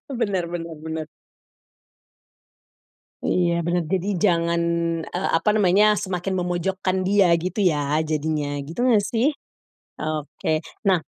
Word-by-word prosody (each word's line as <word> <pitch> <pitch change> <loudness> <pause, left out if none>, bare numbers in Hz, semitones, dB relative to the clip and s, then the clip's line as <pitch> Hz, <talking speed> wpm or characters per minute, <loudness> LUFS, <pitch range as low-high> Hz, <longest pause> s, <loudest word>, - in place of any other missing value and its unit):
Benar 200 -8 -1
benar 165 -1 -5
benar. 160 -1 -4 2.2
Iya, 170 -1 +1
benar. 175 +1 0
Jadi 190 +3 -1
jangan, 170 -2 +2 0.5
eee, 180 +2 -2
apa 165 +6 +2
namanya, 210 +1 +4
semakin 190 -1 -2
memojokkan 185 +1 -1
dia 195 -2 +4
gitu, 185 +5 -2
ya, 150 -4 +2
jadinya, 150 -2 -2
gitu 165 +10 -4
enggak, 230 -5 +4
sih? 235 +7 +2 0.7
Oke. 155 0 -2 0.3
Nah, 185 -2 +5
175 Hz, 115 wpm, -23 LUFS, 160-195 Hz, 2.2 s, Nah